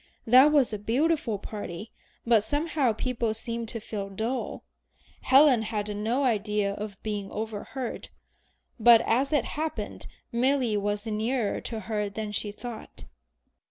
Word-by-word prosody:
That 255 +6 +7
was 275 -6 +3
a 210 - -3
beautiful 250 +1 +1
party, 205 0 -7 0.3
but 230 -3 +4
somehow 290 -2 +1
people 230 -1 -1
seemed 230 0 -4
to 230 - -4
feel 205 -2 -5
dull." 225 +6 -3 0.6
Helen 265 -3 +6
had 210 -1 -3
no 230 +7 0
idea 210 -4 +1
of 205 -1 -6
being 205 -2 -3
overheard, 225 +4 -5 0.7
but 230 0 +8
as 260 +6 +1
it 295 - +2
happened 310 +1 -4 0.2
Milly 250 -1 +2
was 205 +1 -1
nearer 220 +1 -1
to 225 -2 -5
her 210 0 -2
than 210 +1 -5
she 210 0 -2
thought. 230 +1 -9
225 Hz, 135 wpm, -27 LUFS, 210-255 Hz, 0.7 s, but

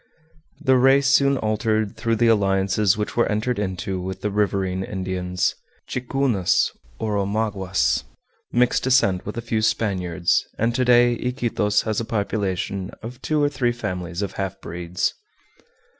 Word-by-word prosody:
The 130 -5 +3
race 135 +2 +5
soon 140 0 +4
altered 110 -1 0
through 115 0 0
the 120 +2 +2
alliances 100 -1 +2
which 105 - -3
were 120 - +3
entered 110 +2 -1
into 95 -1 -3
with 95 +1 -5
the 105 - -1
riverine 95 -2 0
Indians, 90 -2 -2 0.3
Ticunas, 125 -6 +1 0.3
or 105 -2 -1
Omaguas, 95 - 0 0.5
mixed 125 0 +2
descent 125 -9 +2
with 105 - -5
a - - -2
few 110 -1 0
Spaniards, 90 -6 +1
and 115 +2 +1
to 125 - +1
day 120 -1 +5
Iquitos 120 -4 0
has 110 -2 -1
a 115 - -3
population 100 -3 -2
of 120 +3 -8
two 155 -1 +1
or 145 - +3
three 130 -4 0
families 90 -5 -4
of 100 - -3
half 95 0 -4
breeds. 85 0 -2
105 Hz, 145 wpm, -23 LUFS, 95-120 Hz, 0.5 s, race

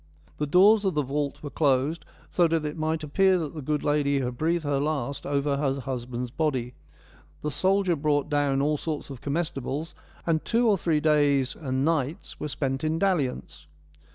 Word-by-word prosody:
The 150 - 0
doors 200 +7 +6
of 190 -5 0
the 150 - +2
vault 140 +2 -3
were 145 - -6
closed, 145 +2 +1 0.3
so 175 -2 +4
that 165 -1 0
it 150 - -3
might 160 0 -1
appear 190 +5 +3
that 155 -5 -4
the 155 - -6
good 150 +2 -1
lady 145 -1 +2
had 125 -2 -2
breathed 165 +5 0
her 145 -2 0
last 140 -2 -2
over 140 0 0
her 140 -1 0
husband's 125 -1 -4
body; 130 -5 -1 0.7
the 150 - -1
soldier 190 +3 +2
brought 145 -1 +1
down 140 -2 +1
all 150 +1 +1
sorts 150 -2 -4
of 130 - -9
comestibles, 150 0 -3 0.3
and 160 -2 +1
two 235 +1 +2
or 210 - +5
three 165 -4 0
days 145 -4 +3
and 135 -3 -2
nights 155 -2 -2
were - - -3
spent 135 -1 -2
in 155 +1 0
dalliance. 165 -9 -1
150 Hz, 180 wpm, -26 LUFS, 140-160 Hz, 0.7 s, doors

